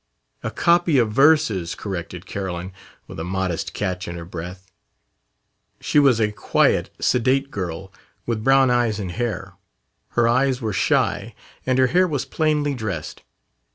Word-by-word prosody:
"A - - -3
copy 170 -3 +3
of 115 -4 +2
verses," 135 - +3
corrected 90 -2 -6
Carolyn, 95 -1 -5 0.3
with - - -9
a - - -3
modest 95 -1 -3
catch 90 0 -3
in 85 - -5
her 85 -1 -7
breath. 90 +2 -8 1.1
She 150 - +2
was 135 -5 +4
a 105 -1 +2
quiet, 105 - +1
sedate 135 +3 +1
girl, 95 -1 -5 0.3
with 115 -2 -2
brown 135 0 +5
eyes 120 -3 +1
and 95 -3 -4
hair. 120 +4 -4 0.6
Her 120 -1 +4
eyes 130 +2 +2
were 110 -4 -3
shy, 90 - 0 0.3
and 130 0 +2
her 130 - +5
hair 185 +1 +4
was 145 -6 -2
plainly 150 -2 0
dressed. 100 - -5
110 Hz, 150 wpm, -22 LUFS, 95-135 Hz, 1.1 s, brown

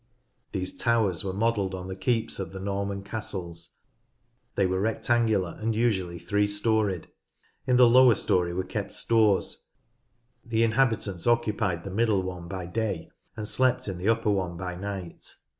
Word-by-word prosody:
These 95 -2 -3
towers 110 -7 +2
were 95 - -2
modelled 100 -2 0
on 90 0 -6
the 95 - -5
keeps 115 +2 -1
of 95 - -5
the 95 - -6
Norman 100 0 -3
castles. 95 -5 -5 0.8
They 100 - +2
were 95 +1 0
rectangular 110 -3 +1
and 110 0 0
usually 95 -7 0
three 105 +3 0
storeyed. 105 -3 +1 0.6
In 125 - +3
the 125 -1 +7
lowest 125 -1 +6
storey 90 -1 +2
were 90 +2 -2
kept - - -4
stores, 110 -4 +1 0.7
the 115 -1 +1
inhabitants 110 -6 +1
occu 120 -3 +2
pied 90 -7 -1
the 100 - -6
middle 105 -2 +2
one 90 -2 -6
by 95 0 -5
day 95 -2 -3 0.3
and 105 -1 -4
slept 130 +1 +1
in 95 -3 -4
the 95 +5 0
upper 115 -2 +2
one 90 -4 -1
by 90 0 -4
night. 95 -1 -7
100 Hz, 160 wpm, -27 LUFS, 95-115 Hz, 0.8 s, the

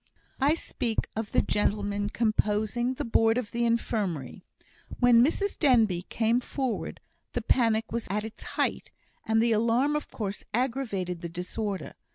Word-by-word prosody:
I 285 +3 +4
speak 235 -8 -2
of 220 -1 -3
the - - +3
gentlemen 205 0 0
composing 220 +3 0
the - - -3
Board 225 0 +3
of 245 -4 -3
the 235 0 0
Infirmary. 205 - -1 0.6
When 240 -1 +6
Mrs 390 +8 0
Denbigh 220 - +3
came 230 +1 +2
forward, 255 -1 -3 0.3
the - - -2
panic 225 -3 +2
was 235 0 -2
at 210 +2 -1
its 220 - -9
height, - - -2 0.4
and 225 0 +3
the 235 - +2
alarm 235 +6 +2
of 300 - -3
course 205 -2 -4
aggravated 225 -9 -1
the 170 - -4
disorder. 185 +1 -4
225 Hz, 150 wpm, -28 LUFS, 205-245 Hz, 0.6 s, When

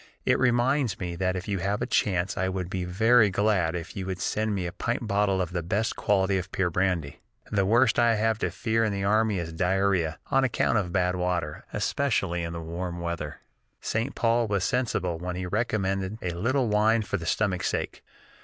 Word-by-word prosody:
It - - +3
reminds 125 -2 +2
me 90 -2 -4
that 95 0 0
if 90 - -5
you 100 -2 -1
have 100 +4 -1
a - - -1
chance 95 -1 0
I 95 +1 0
would 95 -1 -4
be 90 -1 -2
very 110 +4 +4
glad 95 -4 +1
if 85 0 -6
you 95 -1 -4
would 95 -1 -3
send 110 +2 -1
me 95 -2 -2
a 85 - -3
pint - - -2
bottle 100 -1 +1
of 90 -2 -1
the 90 -1 -2
best 100 +7 -1
quality 95 -2 +2
of 95 +1 -7
pure 90 -2 0
brandy. 90 -5 -1 0.3
The 100 -2 +2
worst 120 +3 +4
I 120 -1 +4
have 110 0 +1
to - - 0
fear 115 -1 0
in 110 - +1
the 100 -1 -2
army 105 +1 +2
is 85 -2 -4
diarrhoea, 90 -2 +1
on 135 0 +4
account 120 -3 +2
of 90 -4 -3
bad 90 -1 +1
water, 90 -4 -2
especially 95 -11 0
in 85 0 -4
the 85 - -5
warm 85 +2 -5
weather. 85 -1 -4 0.4
St. 115 +6 -2
Paul 115 0 +2
was 100 -3 0
sensible 105 -9 -1
when 90 +1 -4
he 90 0 -3
recommended 95 -1 -1
'a 90 - -1
little 120 +9 0
wine 110 +1 +3
for 100 0 -2
the 85 -3 -6
stomach's 95 -2 0
sake.' - - -3
95 Hz, 210 wpm, -27 LUFS, 90-110 Hz, 0.4 s, very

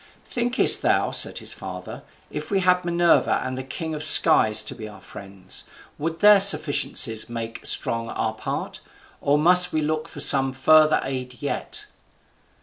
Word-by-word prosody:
"Thinkest 245 +1 +1
thou," - - 0
said - - 0
his - - -4
father, - - -10 0.3
"if - - -8
we 195 -1 -1
had 180 0 +1
Minerva 175 -1 +1
and 130 0 -6
the 130 - -6
king 160 +5 -7
of 150 0 -6
skies 110 -7 +5
to - - -5
be 110 -2 -10
our 105 - -14
friends, 95 -1 -13 0.4
would 165 +2 -5
their 210 -1 +6
sufficiencies 140 - 0
make 115 -1 -8
strong 115 0 -1
our 110 - -4
part; 110 - -7 0.4
or 145 +1 0
must 180 +3 +4
we 155 - -2
look 155 +1 -3
out - - -17
for - - -11
some 135 -2 +3
further 155 +3 +3
aid 130 -2 -7
yet?" 140 - -6
145 Hz, 165 wpm, -21 LUFS, 115-170 Hz, 0.4 s, their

